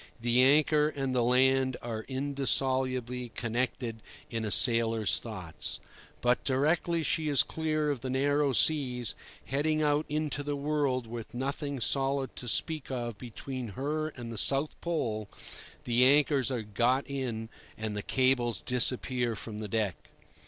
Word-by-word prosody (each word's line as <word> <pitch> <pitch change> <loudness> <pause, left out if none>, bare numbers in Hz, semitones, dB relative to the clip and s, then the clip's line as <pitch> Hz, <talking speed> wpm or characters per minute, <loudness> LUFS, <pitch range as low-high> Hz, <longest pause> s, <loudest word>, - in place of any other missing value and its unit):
The 120 +2 +3
anchor 150 +2 +4
and 135 -3 -3
the 125 - +2
land 130 +1 +3
are 110 -2 -5
indissolubly 130 -2 0
connected 120 -1 -2 0.3
in 115 -1 -2
a - - -2
sailor's 115 -2 +3
thoughts. 95 -8 -6 0.4
But 125 0 +2
directly 160 +5 +1
she 155 0 0
is 145 - +4
clear 155 -2 -1
of 140 - -3
the 130 - -5
narrow 145 +2 +2
seas, 125 -4 +2 0.3
heading 155 +3 0
out 150 +1 +1
into 150 -1 -1
the 145 0 -2
world 140 -3 0
with 115 0 -8
nothing 140 +2 -3
solid 135 +2 0
to 125 - -5
speak 155 +5 +1
of 120 -4 -4
between 125 +1 -6
her 155 +3 -1
and 120 -6 -7
the 110 - -3
South 140 +2 +2
Pole, 110 -11 -2 0.5
the 120 +1 +3
anchors 140 -1 +4
are 125 -4 -2
got 120 +6 +1
in 125 -5 -4 0.3
and 110 -1 -4
the 105 - -2
cables 130 -1 +1
disappear 125 -1 0
from 105 0 -6
the 110 - -4
deck. 105 -3 -2
130 Hz, 145 wpm, -30 LUFS, 120-145 Hz, 0.5 s, anchor